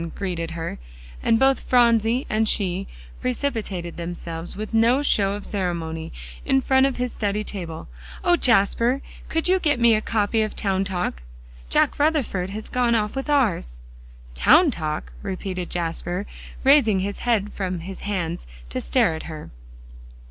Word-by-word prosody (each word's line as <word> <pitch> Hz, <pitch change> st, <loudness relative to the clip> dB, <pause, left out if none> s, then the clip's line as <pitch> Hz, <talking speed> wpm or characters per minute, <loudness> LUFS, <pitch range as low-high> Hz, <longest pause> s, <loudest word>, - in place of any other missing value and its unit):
greeted 175 Hz, -4 st, -3 dB
her, 165 Hz, -, -5 dB, 0.4 s
and 225 Hz, -, +3 dB
both 270 Hz, +2 st, +4 dB
Phronsie 235 Hz, 0 st, +3 dB
and 215 Hz, 0 st, +1 dB
she 190 Hz, -1 st, 0 dB, 0.3 s
precipitated 225 Hz, -, -3 dB
themselves 170 Hz, 0 st, -6 dB
with 215 Hz, +2 st, -5 dB
no 235 Hz, +5 st, +4 dB
show 200 Hz, -7 st, +2 dB
of 205 Hz, 0 st, -6 dB
ceremony, 170 Hz, -5 st, -3 dB, 0.3 s
in 270 Hz, -, +3 dB
front 265 Hz, +1 st, +3 dB
of 270 Hz, -, -3 dB
his 250 Hz, -1 st, -2 dB
study 210 Hz, 0 st, -1 dB
table. 170 Hz, -7 st, -6 dB, 0.4 s
"O 350 Hz, -, +5 dB
Jasper! 235 Hz, -, +3 dB, 0.3 s
could 325 Hz, +1 st, +1 dB
you 375 Hz, +1 st, +4 dB
get 295 Hz, -7 st, +1 dB
me 235 Hz, -1 st, +6 dB
a 215 Hz, -, +2 dB
copy 220 Hz, 0 st, +1 dB
of 215 Hz, -1 st, -2 dB
"Town 195 Hz, -1 st, 0 dB
Talk?" 180 Hz, -, -3 dB, 0.5 s
Jack -, -, +2 dB
Rutherford 280 Hz, -, +1 dB
has 215 Hz, +2 st, -6 dB
gone 245 Hz, -2 st, +2 dB
off 210 Hz, 0 st, 0 dB
with 270 Hz, +2 st, -4 dB
ours." 200 Hz, -, +1 dB, 0.5 s
"Town 295 Hz, -, +5 dB
Talk!" 155 Hz, -7 st, -4 dB
repeated 185 Hz, -2 st, -4 dB
Jasper, 175 Hz, +2 st, -2 dB, 0.4 s
raising 260 Hz, -8 st, +5 dB
his 200 Hz, +1 st, -3 dB
head 215 Hz, -4 st, 0 dB
from 185 Hz, -3 st, -3 dB
his 190 Hz, +3 st, -7 dB
hands 180 Hz, -4 st, -3 dB, 0.2 s
to -, -, -2 dB
stare -, -, +2 dB
at 160 Hz, -, -5 dB
her. 155 Hz, -1 st, -8 dB
205 Hz, 155 wpm, -23 LUFS, 175-245 Hz, 0.5 s, me